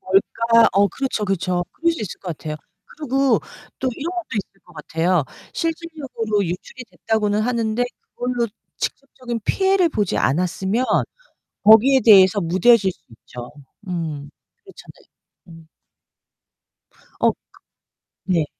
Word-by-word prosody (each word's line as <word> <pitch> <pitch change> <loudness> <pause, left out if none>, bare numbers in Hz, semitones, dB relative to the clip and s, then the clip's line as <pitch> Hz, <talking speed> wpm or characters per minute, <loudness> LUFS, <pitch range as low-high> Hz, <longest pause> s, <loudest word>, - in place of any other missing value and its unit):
뭘까. 230 +4 +3
어 200 +1 +4
그렇죠, 265 -4 -2
그렇죠. 180 -2 -1
그럴 335 0 +1
수 - - -6
있을 205 - -7
거 185 - -8
같아요. 155 -1 -5 0.4
그리고 275 -2 +2 0.4
또 260 - -1
이런 315 +7 -4
것도 355 -2 -5
있을 195 -1 -5
것 180 - -19
같아요. 165 +2 0 0.3
실질적으로 295 - -2
유출이 180 +8 -6
됐다고는 210 +2 0
하는데 230 0 0 0.2
그걸로 245 -1 -2 0.3
직접적인 250 -4 -5
피해를 385 -2 +2
보지 210 - -1
않았으면 190 - 0 0.8
거기에 230 +6 +7
대해서 200 -2 +7
무뎌질 190 +4 +4
수 - - -29
있죠. 120 +2 -11 0.4
음. 155 -5 -4 0.3
그렇잖아요. 385 - -15 0.6
음. 160 - -20 1.5
어. - - +5 1.0
그 185 - 0
네. 165 -3 +2
210 Hz, 275 characters per minute, -21 LUFS, 180-255 Hz, 1.5 s, 거기에